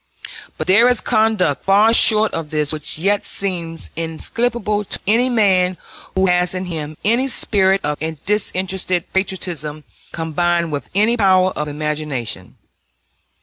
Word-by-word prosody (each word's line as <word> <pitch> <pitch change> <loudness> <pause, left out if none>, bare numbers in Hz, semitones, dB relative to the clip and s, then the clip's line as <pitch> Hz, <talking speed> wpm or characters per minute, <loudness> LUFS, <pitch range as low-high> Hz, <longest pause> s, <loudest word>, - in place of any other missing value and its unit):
But - - -3
there 225 +6 +5
is 250 - +2
conduct 215 - +1
far 205 +4 +4
short 220 -1 +5
of 165 -2 -4
this 150 -1 -1
which 155 -1 -6
yet 200 +5 +1
seems 170 -4 -4
inexplicable 210 +6 -2
to - - -4
any 235 +5 +3
man 190 -6 +2 0.4
who 190 0 +2
has 180 0 +1
in 185 0 -3
him 155 -3 -6
any 235 +5 +2
spirit 195 -6 +2
of 150 0 -2 0.3
disinterested 185 -3 -1
patriotism 175 -6 -3 0.3
combined 170 +1 -1
with 145 -1 -5
any 220 +4 +3
power 185 -3 +3
of 150 - -4
imagination. 150 -9 -4
185 Hz, 135 wpm, -18 LUFS, 160-210 Hz, 0.4 s, there